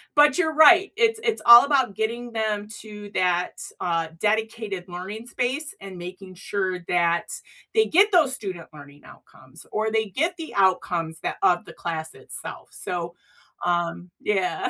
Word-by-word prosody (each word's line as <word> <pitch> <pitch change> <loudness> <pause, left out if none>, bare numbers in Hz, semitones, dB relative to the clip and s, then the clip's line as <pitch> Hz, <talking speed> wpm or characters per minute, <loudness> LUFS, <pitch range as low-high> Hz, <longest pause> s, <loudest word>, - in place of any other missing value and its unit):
but 295 +2 +5
you're 320 -3 +1
right, 345 +5 +7
it's 450 -1 +3
it's 455 -1 0
all 235 +2 +11
about 265 -8 +1
getting 235 +3 -3
them 215 -2 -1
to 210 -1 -10
that, 180 -1 +1 0.3
uh, 165 -2 -1
dedicated 220 -3 -1
learning 190 +5 -7
space 260 +6 -2
and 195 -2 -9
making 185 +2 -9
sure 190 0 -2
that 170 -1 +1 0.5
they 440 0 +5
get 400 +6 +4
those 315 -8 +4
student 185 -7 -7
learning 145 -1 -14
outcomes 130 0 -16
or 220 +1 0
they 220 0 +1
get 320 - -1
the 325 -2 -8
outcomes 175 -4 +1
that - - -3
of 175 -1 +3
the - - -11
class 160 -2 -5
itself, - - -8
so, 170 -1 -5 0.5
um, 175 0 -1
yeah. 195 -3 0
205 Hz, 155 wpm, -24 LUFS, 175-250 Hz, 0.5 s, all